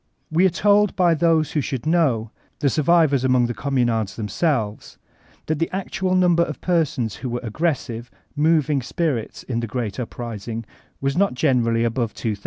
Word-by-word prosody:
We 175 +4 +4
are - - +2
told 205 +3 +3
by 175 -2 +4
those 160 -1 +2
who 150 - 0
should 135 0 -4
know, 140 -10 +1 0.3
the 140 -3 +1
survivors 155 -3 +3
among 125 -2 +3
the 120 - -2
Communards 120 -7 0
themselves, 110 - -2 0.5
that 155 -1 -1
the 165 - 0
actual 190 -1 -1
num* 180 -2 +4
ber 170 - +3
of 155 -3 -2
persons 150 - 0
who 130 - -5
were 120 +1 -2
aggressive, 120 -2 -2 0.3
moving 150 -2 +2
spirits 130 - -2
in 115 -3 -3
the 115 - -3
great 115 -2 -4
uprising 115 -2 -5 0.4
was 135 0 0
not 180 -9 +1
greatly 115 -5 +2
above 115 -1 -1
3,000. 105 -3 -3
135 Hz, 170 wpm, -22 LUFS, 115-165 Hz, 0.5 s, We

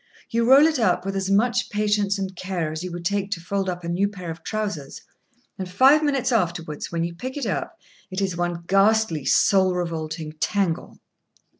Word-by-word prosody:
You 230 +1 +1
roll 275 +3 +8
it 315 -4 +1
up 180 -4 +1
with 195 0 -3
as 195 0 -1
much 240 +5 +2
patience 210 -1 +1
and 190 -1 -4
care 175 -4 -3
as 160 +2 -5
you 180 - -5
would 170 0 -7
take 200 +1 0
to 175 - -6
fold 195 +3 -2
up 180 0 -5
a - - -5
new 180 +4 +1
pair 180 -4 -7
of 165 0 -9
trousers, 200 -11 -4 0.6
and 185 -1 -4
five 265 +11 +5
minutes 275 -4 0
afterwards, 170 -8 -1
when 165 -1 -1
you 170 0 -3
pick 255 +11 -6
it 280 - -2
up, 200 - -3 0.3
it 185 0 -4
is 190 -3 -1
one 175 0 -2
ghastly, 195 -5 +2
soul 190 +5 +3
revolting 160 -2 -4
tangle. 190 -2 -1
190 Hz, 195 wpm, -23 LUFS, 170-210 Hz, 0.6 s, roll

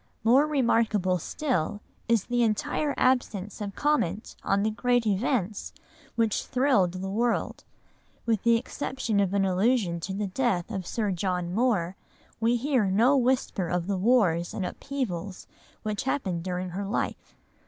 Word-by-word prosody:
More 260 +6 +5
remarkable 225 -9 +2
still 205 - -2 0.3
is 230 -4 +3
the 245 0 0
entire 235 +6 0
absence 215 -6 0
of 200 -1 -5
comment 220 - 0
on 200 +1 +1
the 220 - +1
great 245 +1 +1
events 210 -1 -1 0.4
which 225 -3 +1
thrilled 250 -9 +2
the 185 +1 -4
world; 235 +3 -1 0.6
with 225 -4 +1
the 235 0 +4
exception 245 -3 -2
of 195 -2 +2
an 195 -1 +3
allusion 190 -1 +1
to 185 +3 -4
the 205 +1 -1
death 195 -2 -1
of 190 -4 -4
Sir 215 -4 -1
John 180 -1 -2
Moore, 200 -6 +1 0.4
we 230 +2 +2
hear 255 -2 +1
no 225 +9 +4
whisper 250 -7 +1
of 175 0 -1
the 200 +1 -1
wars 185 -7 +2
and 190 - -2
upheavals 200 -7 -4 0.4
which 215 -1 -2
happened 190 -11 -1
during 180 0 -3
her 195 +3 -4
life. 205 - -3
210 Hz, 150 wpm, -27 LUFS, 185-245 Hz, 0.6 s, More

